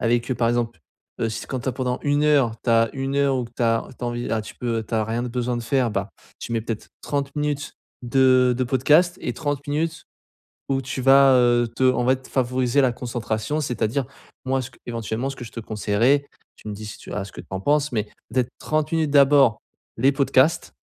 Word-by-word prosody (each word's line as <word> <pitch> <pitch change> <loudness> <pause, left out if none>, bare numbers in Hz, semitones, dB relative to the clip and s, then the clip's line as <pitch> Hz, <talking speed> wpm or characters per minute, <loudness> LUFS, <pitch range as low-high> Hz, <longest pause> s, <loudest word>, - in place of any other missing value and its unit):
avec, 120 +2 +1
heu, - - +2
par 115 -1 +2
exemple, 120 -5 -1 0.4
heu, - - +1
s 110 - -5
quand 130 -2 -4
tu 130 - -4
as - - -7
pendant 125 0 -2
1 145 +1 +1
heure, 140 -7 +4
tu 120 - +1
as 115 -1 +4
1 135 +1 -2
heure 140 -1 +3
ou 125 - -2
que 120 - -20
tu - - -2
as 115 0 +1
tu 125 - -5
as - - -1
envie 120 0 -4
a 110 -1 0
tu - - -10
peux 115 -2 -2
tu 115 - -4
as 110 - +2
rien 115 +2 -2
de - - -3
besoin 125 0 -2
de - - -5
faire, 125 -1 +1
ben 100 0 -2 0.3
tu 115 - -6
mets 115 - +1
peut-être 115 -2 -5
30 140 0 -2
minutes 145 -1 -2 0.3
de 130 0 +4
de 130 - 0
podcast 150 +8 +3
et - - -2
30 145 -2 -3
minutes 160 +3 -2 0.6
où 135 0 0
tu 130 +1 -4
vas, 135 0 +7
heu, 120 -1 +4
te - - -4
en 125 -1 -1
fait, 130 0 0
favoriser 130 +1 +1
la 125 -2 +3
concentration, 120 +3 -3
c'est-à-dire 125 +1 -1 0.4
moi 130 0 0
ce 130 - -8
que - - -22
éventuellement, 115 +2 -3
ce 135 - -8
que 120 - -8
je 115 - -11
te - - -7
conseillerais, 110 +7 +1 0.3
tu 110 - -11
me 105 - -4
dis 110 +1 -8
si 105 - -8
tu - - -10
as 100 -2 -2
ce 100 - -12
que - - -8
tu - - -15
en 95 0 -3
penses, 145 +5 +1
mais 105 -2 -1 0.3
peut-être 125 -2 +1
30 155 +1 -1
minutes, 160 -3 +1
d'abord 140 -5 +5 0.4
les 135 +4 +4
podcasts 140 +3 +2
125 Hz, 240 wpm, -23 LUFS, 115-140 Hz, 0.6 s, vas